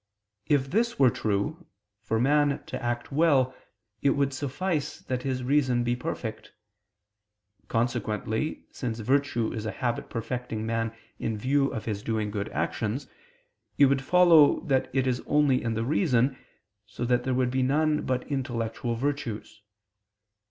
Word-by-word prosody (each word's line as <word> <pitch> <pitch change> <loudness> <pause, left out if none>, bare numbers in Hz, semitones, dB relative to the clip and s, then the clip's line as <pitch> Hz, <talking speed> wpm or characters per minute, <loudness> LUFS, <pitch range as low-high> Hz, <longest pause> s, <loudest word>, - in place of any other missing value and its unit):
If 135 -2 +2
this 235 +5 +1
were 130 -3 +5
true, 125 - -2 0.3
for 110 +1 -1
man 145 +2 +2
to - - -6
act 120 +1 -2
well 140 -4 +3 0.5
it 140 - +3
would 140 0 +1
suffice 145 +4 -2
that 130 -1 -3
his 130 -1 -2
reason 130 -2 +2
be 120 0 +1
perfect. 115 -2 -5 1.1
Consequently, 115 +2 -1
since 115 -4 -4
virtue 120 -1 +1
is 110 -2 -4
a - - -2
habit 120 -1 -2
perfecting 115 -1 -4
man 115 0 -1 0.3
in 110 -1 -2
view 135 +5 +1
of 115 -5 -5
his 105 -3 -3
doing 110 -1 -2
good 100 -1 -3
actions, 115 +6 -2 0.7
it 145 - +7
would 135 0 +2
follow 165 0 +6
that 135 -3 0
it 130 0 +1
is 125 -2 0
only 145 -3 +3
in 115 -1 -2
the 115 +1 -1
reason, 135 -3 +2 0.5
so 110 +3 -4
that 125 0 +2
there 130 0 0
would 125 -1 +1
be 130 +1 +1
none 150 +3 +2
but 125 -1 -1
intellectual 120 -4 -2
virtues. 125 -5 -3
130 Hz, 150 wpm, -27 LUFS, 115-140 Hz, 1.1 s, it